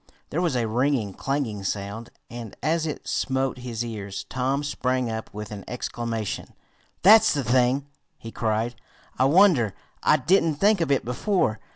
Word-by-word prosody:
There 165 - 0
was 170 -7 +1
a 120 -2 +1
ringing, 120 -3 0
clanging 130 -7 -2
sound, 100 +4 -4 0.2
and 120 -3 -8
as 160 +2 +1
it 150 - -6
smote 130 -1 -1
his 120 -2 -4
ears 100 -4 -5
Tom 135 +2 -1
sprang 130 -4 -1
up 110 0 -5
with 105 0 -7
an 100 -2 -7
exclamation. 115 -3 -4 0.5
"That's 215 -1 +7
the 140 - 0
thing!" 125 +3 +2 0.3
he 115 - -9
cried. 110 +1 -1 0.5
"I 130 - +5
wonder 145 - +4 0.3
I 150 - +4
didn't 165 +2 +2
think 200 +4 +3
of 165 - 0
it 140 - +1
before. 125 - 0
125 Hz, 160 wpm, -25 LUFS, 110-145 Hz, 0.5 s, That's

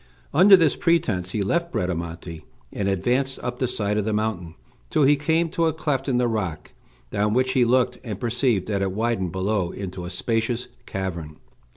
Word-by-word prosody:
Under 190 +6 +8
this 165 -5 +3
pretence 130 - +1
he 100 +2 -1
left 170 - 0
Bradamante, 85 - -4 0.3
and 100 - -2
advanced 125 +8 0
up 125 0 -4
the 130 - +1
side 105 -3 -1
of - - 0
the 110 - -1
mountain 100 -6 -2 0.3
till 155 - +2
he 145 +2 +6
came 160 +4 +1
to 165 0 +1
a 160 - +1
cleft 140 -3 -1
in 125 - +2
the 125 0 +2
rock, 95 -9 -3 0.4
down 105 +1 +1
which 130 0 +2
he 130 - +4
looked, 125 +1 +2
and 105 -5 -5
perceived 120 -4 0
that 100 -2 -1
it 95 -1 -1
widened 110 -4 -1
below 95 0 0
into 95 -2 -6
a 90 - -5
spacious 115 +5 -2 0.2
cavern. 85 -5 -4
110 Hz, 190 wpm, -24 LUFS, 95-130 Hz, 0.4 s, Under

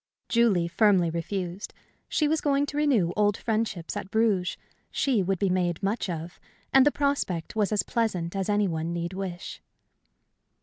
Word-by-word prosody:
Julie 220 -8 +3
firmly 185 -2 +3
refused. 180 +2 -4 0.3
She 305 - +2
was 315 +1 +1
going 285 -1 +2
to 290 0 -6
renew 245 - +2
old 205 -1 +2
friendships 215 -7 -2
at 190 - -5
Bruges; 210 -4 +1 0.3
she 260 -7 +1
would 190 +1 0
be 200 - +1
made 180 -1 0
much 205 +1 -1
of; 165 -1 -6 0.3
and 270 +1 +7
the - - +5
prospect 280 - -1
was 210 -2 +1
as 205 -3 +2
pleasant 185 -7 -1
as 195 +1 -2
any 205 -1 +2
one 165 0 -2
need 170 +1 -3
wish. 185 -2 -6
195 Hz, 165 wpm, -27 LUFS, 175-225 Hz, 0.3 s, and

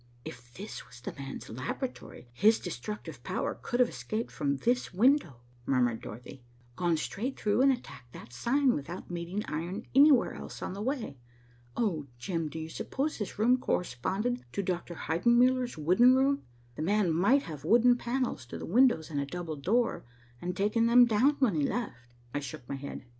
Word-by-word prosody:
"If 120 0 -10
this 205 +4 -8
was 120 - -14
the 120 - -6
man's 135 -1 -7
laboratory, 130 - -6
his 220 - +4
destructive 180 - -6
power - - -3
could 240 - -2
have 250 -1 +5
escaped 220 +2 -4
from 140 -3 -1
this 245 - 0
window," 210 - +2 0.3
murmured 120 -4 +1
Dorothy, 125 +4 -9 0.3
"gone 175 0 +1
straight 235 - -4
through, 210 +3 +2
and 275 +1 +6
attacked 140 - -7
that 120 - -11
sign, 260 - +2
without 170 +6 -6
meeting 175 +4 -3
iron 175 +8 -4
anywhere 275 -1 +6
else - - -8
on - - -4
the 200 - -6
way. 230 - -3 0.6
Oh, 165 -11 0
Jim, 165 +3 -3
do 160 - -8
you 160 0 -4
suppose 275 - -3
this 210 - -5
room 240 +4 +4
corresponded 195 - -1
to 200 - -1
Dr. 175 -1 -3
Heidenmuller's 240 +8 +2
wooden 185 +12 +5
room? 275 +1 +2 0.3
The 135 - -7
man 190 0 +2
might 240 - +3
have 150 -4 -8
wooden 240 +7 +5
panels 240 - -2
to - - -7
the - - -6
windows 230 -6 +3
and 145 - -1
a - - -2
double 170 0 -5
door, 215 - 0 0.4
and 180 +1 -4
taken 210 +3 +2
them 245 +1 +7
down 240 +6 +3
when 255 -7 +2
he 155 - 0
left." 240 -3 -2 0.4
I 145 - 0
shook 130 -3 -8
my - - -4
head. 135 -1 -7
195 Hz, 180 wpm, -30 LUFS, 150-245 Hz, 0.6 s, them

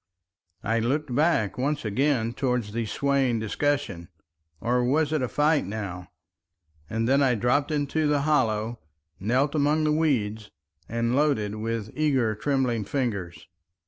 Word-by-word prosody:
I 110 +2 +1
looked 130 +4 -1
back 135 - +1
once 145 +1 -1
again 120 +1 +1
towards 125 -5 -1
the 115 0 -2
swaying 135 0 +1
discussion—or 85 - -3
was 150 +4 +1
it 155 - +1
a 125 - 0
fight 150 - +2
now? 95 -4 -5 0.8
and 115 +1 -1
then 135 +2 +4
I 130 -3 +3
dropped 125 +6 +1
into 150 +1 0
the 145 -1 +2
hollow, 115 -6 +1 0.4
knelt 130 +8 +1
among 150 +1 +2
the 155 - +2
weeds, 110 -9 0 0.4
and 115 +1 0
loaded 135 -8 +1
with 110 0 -3
eager 135 -7 +1
trembling 120 0 0
fingers. 100 -7 -3
125 Hz, 135 wpm, -26 LUFS, 110-145 Hz, 0.8 s, then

